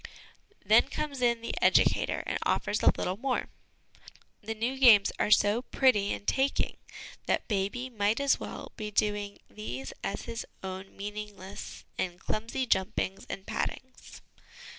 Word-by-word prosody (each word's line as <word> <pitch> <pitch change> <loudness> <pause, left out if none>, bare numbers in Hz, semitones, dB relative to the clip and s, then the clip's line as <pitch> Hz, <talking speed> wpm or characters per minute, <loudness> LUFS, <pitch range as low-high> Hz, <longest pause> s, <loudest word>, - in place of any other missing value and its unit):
Then - - +5
comes 280 -4 -3
in 235 -1 +2
the 230 - -4
educator - - +3
and - - -1
offers - - 0
a - - +6
little 185 +2 -1
more. 255 +2 -1 0.9
The 225 +1 -4
new 245 +5 -2
games 220 -6 +7
are - - +2
so 210 +2 +4
pretty 250 -6 +3
and - - -4
taking 270 +4 +1 0.5
that - - +1
baby 205 +5 -1
might 215 -2 0
as 280 -1 +3
well - - -7
be 215 -1 -4
doing 205 -1 0
these 135 - -6
as 200 - -3
his 230 -1 -5 0.2
own 190 +1 -7
meaningless 205 -1 -7
and 175 -1 -2
clumsy 230 +6 -2
j 210 - +4
umpings 190 -1 -4
and 195 - -5
pattings. 260 0 -5
210 Hz, 145 wpm, -30 LUFS, 200-245 Hz, 0.9 s, games